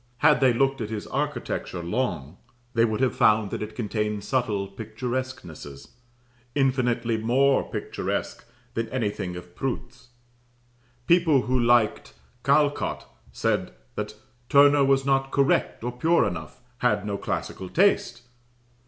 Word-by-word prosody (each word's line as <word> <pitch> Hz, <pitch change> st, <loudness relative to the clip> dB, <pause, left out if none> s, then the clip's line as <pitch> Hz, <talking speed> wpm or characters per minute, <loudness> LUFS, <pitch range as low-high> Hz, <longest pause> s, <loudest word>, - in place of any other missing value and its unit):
Had 150 Hz, 0 st, +4 dB
they 130 Hz, -1 st, +5 dB
looked 135 Hz, +2 st, +1 dB
at 105 Hz, -, -3 dB
his 110 Hz, -2 st, -4 dB
architecture 85 Hz, -2 st, -3 dB
long, 90 Hz, -, -2 dB, 0.4 s
they 115 Hz, 0 st, +4 dB
would 110 Hz, +1 st, -1 dB
have 130 Hz, -, +2 dB
found 105 Hz, -2 st, +3 dB
that -, -, -4 dB
it 105 Hz, 0 st, -6 dB
contained 105 Hz, -2 st, -2 dB
subtle 105 Hz, -5 st, -1 dB
picturesquenesses, 110 Hz, -, -6 dB, 0.7 s
infinitely 125 Hz, -4 st, +1 dB
more 135 Hz, +5 st, +2 dB
picturesque -, -, -4 dB, 0.3 s
than 115 Hz, 0 st, -2 dB
anything 105 Hz, -7 st, -2 dB
of 90 Hz, 0 st, -10 dB
Prout's. 125 Hz, -1 st, -5 dB, 1.0 s
People 165 Hz, -6 st, +4 dB
who 130 Hz, +1 st, 0 dB
liked 120 Hz, -2 st, +2 dB, 0.3 s
Callcott 145 Hz, +1 st, +1 dB, 0.3 s
said -, -, -1 dB, 0.2 s
that -, -, -5 dB, 0.3 s
"Turner 145 Hz, 0 st, +6 dB
was 135 Hz, 0 st, +3 dB
not 135 Hz, -1 st, +2 dB
correct 135 Hz, -4 st, +1 dB
or 120 Hz, -, -2 dB
pure 160 Hz, +8 st, +2 dB
enough 85 Hz, +2 st, -6 dB, 0.2 s
had 105 Hz, -4 st, +1 dB
no 100 Hz, -1 st, -2 dB
classical 95 Hz, -1 st, -4 dB
taste." 170 Hz, -10 st, +2 dB
120 Hz, 125 wpm, -25 LUFS, 105-135 Hz, 1.0 s, Turner